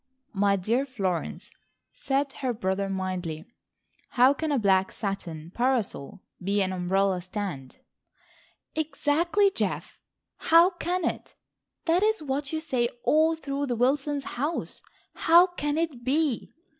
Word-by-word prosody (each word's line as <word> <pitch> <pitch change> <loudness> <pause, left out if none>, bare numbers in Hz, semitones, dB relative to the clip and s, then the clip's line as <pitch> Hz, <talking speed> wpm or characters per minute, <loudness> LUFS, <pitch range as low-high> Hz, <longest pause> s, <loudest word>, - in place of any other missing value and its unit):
"My 200 0 +3
dear 225 +8 0
Florence," 195 -9 -3 0.4
said 275 0 -1
her 260 -4 -2
brother 195 -3 -1
mildly, 185 -4 -3 0.7
"how 255 +3 +7
can 310 +2 -3
a 285 - +2
black 190 -4 +3
satin 175 -6 -5
parasol 235 - -1 0.2
be 200 +2 +1
an 185 0 -2
umbrella 185 +1 +1
stand?" 180 -8 -6 1.0
"Exactly, 320 +5 +1
Geof, - - -3 0.4
how 335 +3 +5
can 350 0 -2
it? - - -4 0.5
That 340 +2 +3
is 430 -5 +1
what 280 0 -2
you 315 - -1
say 255 -7 0
all 315 +4 +3
through 280 -2 -3
the 245 - -1
Wilsons' 275 +4 +1
house. 290 +8 -3 0.3
How 340 +2 +6
can 295 -5 -3
it 310 -7 -2
be! 280 -1 0
260 Hz, 130 wpm, -27 LUFS, 195-310 Hz, 1.0 s, how